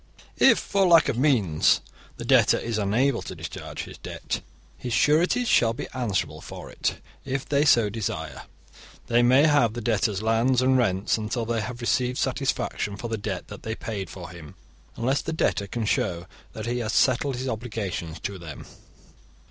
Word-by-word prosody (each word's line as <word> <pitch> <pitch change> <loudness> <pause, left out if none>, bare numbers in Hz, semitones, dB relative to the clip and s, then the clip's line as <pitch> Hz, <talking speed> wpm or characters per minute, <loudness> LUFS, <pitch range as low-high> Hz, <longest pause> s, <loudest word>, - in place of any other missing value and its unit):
If, - - +7
for 195 -1 +1
lack 170 -2 +6
of - - -1
means, 110 - +3 0.4
the - - -6
debtor - - +5
is 115 -2 -2
unable 115 +6 +1
to - - -7
discharge - - -7
his - - -11
debt, - - -5 0.3
his 125 -2 -5
sureties 175 - +3
shall 115 - +4
be - - -6
answerable 95 - -2
for - - -9
it. - - -2 0.2
If 135 0 -3
they 145 +1 +2
so 120 -7 +5
desire, 105 -1 -4 0.6
they 120 +1 +3
may 130 +5 +5
have 145 -8 +3
the 120 - -4
debtor's 105 -3 0
lands 115 +3 +2
and 130 +1 +3
rents 105 -4 +1
until 110 +2 -2
they 115 0 -1
have 120 +3 -6
received 125 +1 0
satisfaction 100 -1 -1
for 120 +3 -5
the 115 - -1
debt 95 -3 -4
that - - -9
they 110 0 -4
paid 100 -7 -5
for 90 -3 -9
him, 80 -4 -11 0.4
unless 130 +4 0
the - - -4
debtor 100 -9 0
can 115 +2 -3
show 85 -4 0 0.3
that 110 - -6
he 120 +1 -1
has 115 -1 -2
settled 130 +1 +2
his 130 +2 -4
obligations 100 -9 -4
to 100 -1 -5
them. 80 -4 -9
115 Hz, 180 wpm, -25 LUFS, 100-130 Hz, 0.6 s, If